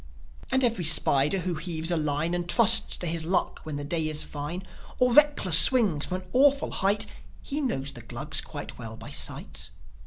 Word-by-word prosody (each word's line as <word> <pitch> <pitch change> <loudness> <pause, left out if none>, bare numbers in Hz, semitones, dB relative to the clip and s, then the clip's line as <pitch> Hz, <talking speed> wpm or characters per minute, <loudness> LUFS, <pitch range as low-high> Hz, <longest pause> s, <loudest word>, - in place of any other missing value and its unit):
And 265 0 0
every 230 -7 -1
spider 150 0 +3
who 180 0 -4
heaves 165 0 -3
a - - +1
line 155 +2 -3
And 175 0 -5
trusts 230 +1 +5
to - - -6
his 165 -1 -3
luck 180 +4 -3
when 155 -2 -9
the 145 - -7
day 160 +2 -4
is 155 -1 0
fine, 150 +5 -8 0.3
Or 250 -1 0
reckless 290 - +5
swings 200 - +4
from 185 0 -6
an - - -22
awful 280 +2 +1
height, 200 +2 0 0.4
He 295 +1 -5
knows 140 - -4
the 120 - -13
Glugs 125 +6 -2
quite 145 -4 -11
well 110 -2 -9
by - - -12
sight. - - -4
170 Hz, 190 wpm, -24 LUFS, 150-215 Hz, 0.4 s, trusts